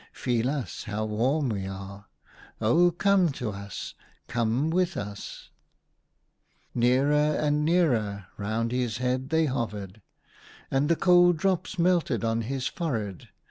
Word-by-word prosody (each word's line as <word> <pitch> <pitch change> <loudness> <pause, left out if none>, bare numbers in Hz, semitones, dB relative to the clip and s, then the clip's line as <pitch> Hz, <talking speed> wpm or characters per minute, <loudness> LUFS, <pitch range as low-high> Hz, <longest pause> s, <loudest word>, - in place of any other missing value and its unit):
Feel 120 -1 0
us, 140 -4 -4
how 105 +1 -2
warm 125 +7 0
we 100 -3 -3
are! 95 +1 -8 0.5
Oh, 165 +11 +4
come 180 -1 +2
to 120 -5 -4
us! 100 0 -7 0.3
Come 120 +6 0
with 180 +1 +1
us! 100 0 -7 0.6
" - - -43
Nearer 145 +5 +3
and 150 0 +1
nearer 120 - +1
round 110 +3 -2
his 125 -3 -1
head 130 +1 -1
they 160 +1 +3
hovered, 110 -7 -4 0.7
and 135 +2 +1
the 170 - +4
cold 175 -1 +5
drops 185 +1 -1
melted 170 - +2
on 115 0 0
his 130 +3 -3
forehead. 110 - -3
125 Hz, 135 wpm, -27 LUFS, 110-155 Hz, 0.7 s, cold